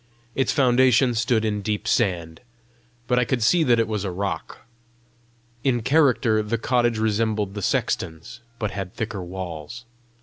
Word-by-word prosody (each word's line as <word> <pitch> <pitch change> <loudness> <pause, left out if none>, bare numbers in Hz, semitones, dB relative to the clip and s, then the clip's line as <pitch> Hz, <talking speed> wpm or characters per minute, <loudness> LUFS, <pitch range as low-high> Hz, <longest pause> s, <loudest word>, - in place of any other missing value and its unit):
Its 135 - +1
foundation 130 -1 +4
stood 115 -1 +1
in 105 -1 -1
deep 105 +2 -3
sand, 85 -9 0 0.6
but 125 +1 +2
I - - +3
could 120 -1 -1
see 170 +8 +4
that 120 -2 +4
it 115 - +1
was 105 -3 -2
a 100 - -2
rock. 95 +2 -4 1.0
In 120 -4 +1
character 130 -6 +3
the 105 +2 -2
cottage 120 0 +1
resembled 110 -2 0
the 105 - -5
sexton's, 80 +1 -2 0.2
but 105 -3 -3
had 95 -2 -6
thicker 110 -4 -4
walls. 90 +4 -7
110 Hz, 155 wpm, -23 LUFS, 100-120 Hz, 1.0 s, foundation